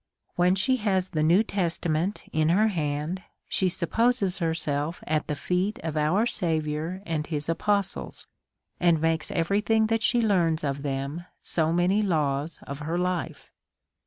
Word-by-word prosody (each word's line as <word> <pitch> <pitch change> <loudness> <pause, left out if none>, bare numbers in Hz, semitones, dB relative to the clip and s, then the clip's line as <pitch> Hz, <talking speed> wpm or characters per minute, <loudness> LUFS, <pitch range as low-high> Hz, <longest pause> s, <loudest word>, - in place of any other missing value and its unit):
When 180 +1 +3
she 260 +7 +2
has 190 -4 0
the 155 -4 -1
New 170 +7 +5
Testament 175 -2 -1
in 155 0 +2
her 210 +6 +4
hand, 155 0 -2 0.3
she 190 - +1
supposes 195 +2 +1
herself 160 -1 -2
at 155 -1 0
the 150 - -1
feet 185 +7 -1
of 160 -2 -3
our 155 +9 +2
Saviour 160 -2 -2
and 155 -4 -2
his 150 -2 -2
apostles, 200 +4 -1 0.5
and 170 -2 +4
makes 160 0 0
every 190 +5 +1
thing 220 0 +3
that 225 - +1
she 240 +2 +2
learns 175 -8 +2
of 140 -1 -2
them 140 +4 -3 0.2
so 160 -1 +1
many 180 +5 +2
laws 155 -5 0
of 140 0 -6
her 160 +3 -2
life. 180 -1 -2
170 Hz, 155 wpm, -26 LUFS, 155-195 Hz, 0.5 s, New